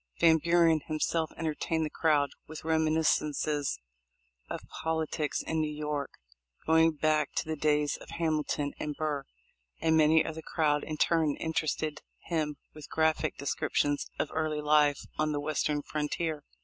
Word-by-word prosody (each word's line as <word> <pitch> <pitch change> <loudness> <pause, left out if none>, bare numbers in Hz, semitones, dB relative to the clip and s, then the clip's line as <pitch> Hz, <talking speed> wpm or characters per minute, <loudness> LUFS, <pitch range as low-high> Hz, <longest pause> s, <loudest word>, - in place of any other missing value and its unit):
Van 160 -1 +6
Buren 165 -1 +4
himself 160 +1 0
entertained 160 0 -1
the - - -3
crowd 150 -3 +2 0.2
with 155 0 -8
reminiscences 155 - +1 0.7
of - - -4 0.2
politics 160 -2 -1
in 160 0 -1
New 155 -1 -1
York, 150 -2 -3 0.5
going 160 0 +5
back 155 0 +1
to - - -1
the 160 0 -2
days 150 -1 +1
of - - -14
Hamilton 155 -3 -1
and 150 -1 -3
Burr, 150 -3 -2 0.5
and 160 0 +3
many 155 0 +5
of 160 - -3
the 160 - -7
crowd 150 -2 +1
in 155 -1 -5
turn 160 -2 +2
interested 155 -1 -2 0.2
him 155 -3 -1 0.2
with 155 -1 -11
graphic 160 -1 +1
descriptions 145 +1 0
of - - -2
early 155 -1 -1
life 150 -1 +3
on 155 0 +1
the 145 - -1
western 150 0 -1
frontier. 150 0 -2
155 Hz, 150 wpm, -30 LUFS, 150-160 Hz, 0.7 s, Van